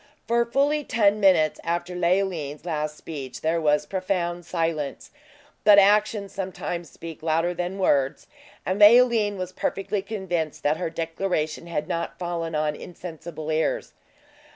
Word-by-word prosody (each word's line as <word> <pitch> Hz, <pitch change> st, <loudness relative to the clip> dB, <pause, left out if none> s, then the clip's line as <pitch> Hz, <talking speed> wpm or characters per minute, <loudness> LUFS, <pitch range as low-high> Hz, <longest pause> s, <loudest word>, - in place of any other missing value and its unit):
For 235 Hz, +1 st, +2 dB
fully 290 Hz, +4 st, +1 dB
ten 210 Hz, -4 st, +2 dB
minutes 175 Hz, -6 st, +4 dB
after 175 Hz, +1 st, -2 dB
Leoline's 175 Hz, -4 st, -1 dB
last 150 Hz, -2 st, -2 dB
speech, 135 Hz, -6 st, -7 dB
there 165 Hz, +1 st, +1 dB
was 150 Hz, -1 st, +2 dB
profound 175 Hz, -2 st, -2 dB
silence. 165 Hz, -5 st, -2 dB, 0.5 s
But 210 Hz, -1 st, +8 dB
actions 205 Hz, 0 st, +3 dB
sometimes 175 Hz, -3 st, -4 dB
speak 165 Hz, -1 st, -10 dB
louder 165 Hz, +2 st, +1 dB
than 180 Hz, +2 st, -3 dB
words; 140 Hz, -7 st, +1 dB, 0.4 s
and 185 Hz, +2 st, -1 dB
Leoline 220 Hz, -2 st, +6 dB
was 185 Hz, -1 st, -4 dB
perfectly 195 Hz, +2 st, -2 dB
convinced 190 Hz, -7 st, -3 dB
that 150 Hz, +2 st, +2 dB
her 175 Hz, -, -2 dB
declaration 165 Hz, -1 st, -2 dB
had 155 Hz, -2 st, -3 dB
not 170 Hz, 0 st, -3 dB
fallen 170 Hz, -2 st, -3 dB
on 150 Hz, 0 st, 0 dB
insensible 165 Hz, -2 st, -7 dB
ears. 155 Hz, +1 st, -1 dB
175 Hz, 135 wpm, -25 LUFS, 160-195 Hz, 0.5 s, But